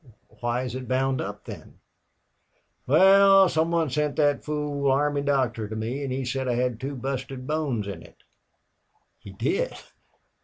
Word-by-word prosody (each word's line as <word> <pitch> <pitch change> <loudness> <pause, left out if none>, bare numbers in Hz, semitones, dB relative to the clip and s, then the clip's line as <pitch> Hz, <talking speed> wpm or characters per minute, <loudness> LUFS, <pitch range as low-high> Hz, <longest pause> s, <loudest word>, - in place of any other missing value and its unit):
"Why 120 +1 -1
is 125 -3 -5
it 130 -1 -6
bound 130 0 0
up, 100 +1 -7
then?" - - -10 1.1
"Wal, 195 +5 +6
some 160 -1 0
one 165 -4 0
sent 150 0 -1
thet 145 -2 +2
fool 150 -2 -2
army 145 +1 +1
doctor 130 -6 0
to 110 - -6
me 115 +6 -3
an' 135 - -3
he 130 +1 -3
said 130 +1 -2
I 120 - 0
had 125 -2 -1
two 140 +1 -4
busted 130 0 -5
bones 145 -8 -1
in 100 -5 -6
it." - - -17 1.0
"He - - -12
did! 395 - -2
135 Hz, 160 wpm, -25 LUFS, 125-150 Hz, 1.1 s, Wal